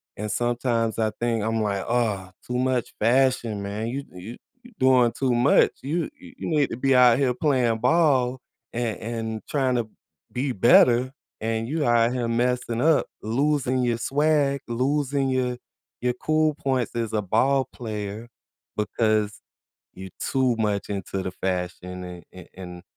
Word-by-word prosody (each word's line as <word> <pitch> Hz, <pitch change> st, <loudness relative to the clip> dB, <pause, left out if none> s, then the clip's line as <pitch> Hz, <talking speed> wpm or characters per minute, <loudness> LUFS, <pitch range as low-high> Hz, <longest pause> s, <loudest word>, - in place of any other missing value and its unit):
and 105 Hz, 0 st, -4 dB
sometimes 120 Hz, -1 st, 0 dB
I 110 Hz, -1 st, +1 dB
think, 115 Hz, -3 st, 0 dB
I'm, 110 Hz, 0 st, 0 dB
like, 100 Hz, -2 st, -1 dB
"Oh, 110 Hz, -6 st, 0 dB, 0.2 s
too 125 Hz, -, -2 dB
much 130 Hz, -1 st, 0 dB
fashion, 120 Hz, -3 st, +2 dB
man. 105 Hz, +3 st, -4 dB
You 135 Hz, +4 st, -3 dB
you 95 Hz, +7 st, -9 dB, 0.3 s
you 245 Hz, -, -15 dB
doing 130 Hz, -2 st, +4 dB
too 130 Hz, -2 st, 0 dB
much. 120 Hz, +4 st, +4 dB
You 160 Hz, +6 st, -2 dB
you 265 Hz, -2 st, -14 dB
you -, -, -5 dB
need 150 Hz, -3 st, +2 dB
to 115 Hz, -, -5 dB
be 135 Hz, +1 st, +2 dB
out 125 Hz, -1 st, +6 dB
here 135 Hz, -3 st, +2 dB
playing 125 Hz, -6 st, +1 dB
ball 130 Hz, -2 st, +2 dB, 0.3 s
and 115 Hz, -2 st, -2 dB
and 110 Hz, -1 st, -4 dB
trying 130 Hz, -3 st, +1 dB
to 115 Hz, -2 st, -1 dB, 0.4 s
be 130 Hz, +2 st, -1 dB
better, 120 Hz, +3 st, +5 dB, 0.3 s
and 115 Hz, +1 st, -1 dB
you 155 Hz, +1 st, -1 dB
out 120 Hz, -1 st, +3 dB
here 125 Hz, -2 st, -1 dB
messing 120 Hz, 0 st, 0 dB
up, 160 Hz, 0 st, +3 dB, 0.2 s
losing 130 Hz, +2 st, +1 dB
your 120 Hz, -2 st, +1 dB
swag, 140 Hz, +1 st, +1 dB
losing 135 Hz, +2 st, 0 dB
your 125 Hz, -1 st, 0 dB, 0.4 s
your 125 Hz, 0 st, +1 dB
cool 155 Hz, +4 st, +1 dB
points 130 Hz, -6 st, -1 dB
as 115 Hz, -2 st, -2 dB
a 105 Hz, -, +1 dB
ball 130 Hz, +7 st, +2 dB
player 105 Hz, -1 st, -6 dB, 0.5 s
because 105 Hz, 0 st, 0 dB, 0.5 s
you're 95 Hz, 0 st, -8 dB
too 130 Hz, -3 st, +1 dB
much 105 Hz, -2 st, -1 dB
into 100 Hz, -1 st, -3 dB
the 95 Hz, -, -3 dB
fashion 90 Hz, 0 st, -4 dB
and 90 Hz, -1 st, -9 dB
a 90 Hz, -2 st, -12 dB
and 90 Hz, -1 st, -9 dB
120 Hz, 160 wpm, -24 LUFS, 110-130 Hz, 0.5 s, out